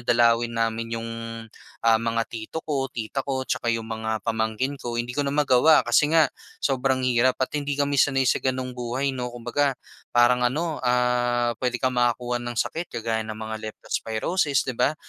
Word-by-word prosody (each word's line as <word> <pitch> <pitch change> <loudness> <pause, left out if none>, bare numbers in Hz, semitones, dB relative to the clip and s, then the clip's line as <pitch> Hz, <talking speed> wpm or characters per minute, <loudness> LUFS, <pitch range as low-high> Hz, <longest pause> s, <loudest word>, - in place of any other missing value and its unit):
dalawin 120 -1 +3
namin 115 0 -1
'yong, 115 0 -5 0.7
ah, 115 -1 +5
mga 115 0 0
tito 115 +8 -7
ko, 135 -3 -1
tita 120 +3 -4
ko, 130 -1 -2
tsaka 120 - -2
'yong 115 -1 0
mga 110 -1 -3
pamangkin 110 +4 -1
ko, 120 -1 -4
hindi 120 +1 -2
ko 145 - -1
na 140 - 0
magawa 145 -3 +3 0.3
kasi 145 - +3
nga 160 -2 +5 0.3
sobrang 130 -1 +1
hirap 125 0 +3
at - - 0
hindi 145 -1 -2
kami 140 -1 0
sanay 135 0 +3
sa 130 - +2
ganong 130 -1 -2
buhay 130 +3 -1
'no. 125 -2 -4
Kumbaga 120 +4 0 0.4
parang 120 +1 +5
ano 155 +3 -1
ah, 125 -1 +2
puwede 125 -1 -2
kang 130 -1 +1
makakuha 120 0 +1
ng 120 0 -5
sakit 165 +9 -2
kagaya 110 -1 -2
ng 110 - -5
mga 110 0 -5
leptospirosis, 135 - -1
'di 130 - -4
ba, 150 - +3
120 Hz, 180 wpm, -25 LUFS, 115-135 Hz, 0.7 s, ah